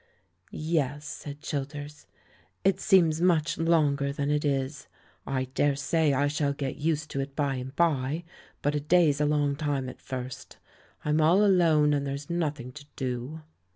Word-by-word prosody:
"Yes," 150 -2 -1
said 145 0 -8
Childers, 145 0 -5 0.6
"it 195 -1 +2
seems 170 -5 +4
much 165 -3 +2
longer 150 -4 +2
than 140 +1 -2
it 150 0 +1
is. 140 0 -2 0.4
I 130 -1 -1
daresay 145 +3 +2
I 140 +1 +2
shall 145 -1 0
get 140 -2 -4
used 155 0 -1
to 140 - -3
it 135 0 -4
by 140 -3 0
and 130 +2 -7
by, 155 -1 +1 0.4
but 145 - +1
a 150 - 0
day's 150 -1 +3
a - - +3
long 145 -1 +1
time 145 -3 -2
at 125 - -9
first; 130 -1 -7 0.5
I'm 150 +1 +2
all 180 +7 +5
alone, 160 -6 +4
and 140 -1 0
there's 140 +3 -5
nothing 150 -7 -2
to 145 +2 -12
do." 130 +4 -4
145 Hz, 160 wpm, -28 LUFS, 140-155 Hz, 0.6 s, all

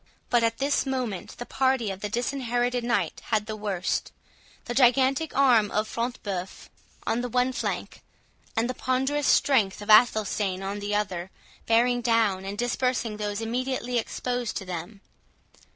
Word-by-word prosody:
But 240 - +4
at 230 0 +1
this 280 0 +1
moment 250 -8 -3
the 240 - -6
party 260 -6 +1
of 190 - -7
the 210 +1 -4
Disinherited 245 0 -1
Knight 220 -8 -1
had 215 -2 0
the 215 0 -5
worst; 200 -4 -2 0.5
the 240 - -3
gigantic 265 +4 +3
arm 240 -7 +5
of 215 +2 0
Front 240 +2 -3
de 205 - -3
Bœuf 185 0 -6 0.4
on 235 - 0
the 245 - -3
one 250 +2 +1
flank, - - -4 0.6
and 225 +1 +2
the 255 - -2
ponderous 265 +3 0
strength 220 -9 +3
of 205 +1 -1
Athelstane 210 -4 +4
on 200 +1 -3
the 205 0 -2
other, 185 -4 -2 0.4
bearing 245 +2 +3
down 225 -5 +2
and 200 +1 -5
dispersing 245 -2 -1
those 210 0 -3
immediately 245 +1 -1
exposed 245 +1 -3
to 195 - -5
them. 185 +3 -6
230 Hz, 160 wpm, -26 LUFS, 205-250 Hz, 0.6 s, arm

